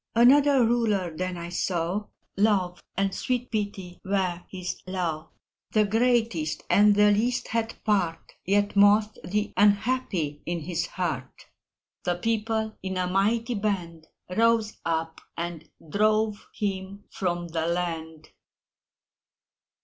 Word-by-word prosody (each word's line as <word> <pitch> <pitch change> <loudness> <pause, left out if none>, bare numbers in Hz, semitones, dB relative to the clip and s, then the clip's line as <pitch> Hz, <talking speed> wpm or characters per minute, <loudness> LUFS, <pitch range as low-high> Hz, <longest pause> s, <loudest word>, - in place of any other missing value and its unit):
Another 270 +2 +6
Ruler 210 -8 +1
then 185 +1 -3
I 170 0 -6
saw 180 +3 -1 0.3
Love 195 -4 +1 0.2
and 195 0 +1
sweet 250 -1 -2
Pity 200 -5 -4
were 190 -3 0
his 185 -1 -5
law: 170 -4 -3 0.4
The 215 -1 +4
greatest 225 -7 +1
and 205 0 +6
the 210 0 +5
least 240 +5 0
had 230 0 -1
part 190 -6 0
(Yet 205 +2 +1
most 210 +1 +4
the 210 +3 -2
unhappy) 200 - +1
in 170 -1 -2
his 170 +1 -2
heart 155 -9 -4 0.6
The 175 - 0
People, 220 +2 -1
in 190 0 -3
a 180 - +1
mighty 215 +6 +1
band, 180 -7 -3 0.3
Rose 225 -1 +3
up, 165 0 -2 0.2
and 170 -2 -5 0.2
drove 215 +4 +1
him 195 0 -3
from 175 -2 -2
the 160 0 -1
land! 165 -2 -3
195 Hz, 120 wpm, -26 LUFS, 175-215 Hz, 0.6 s, Another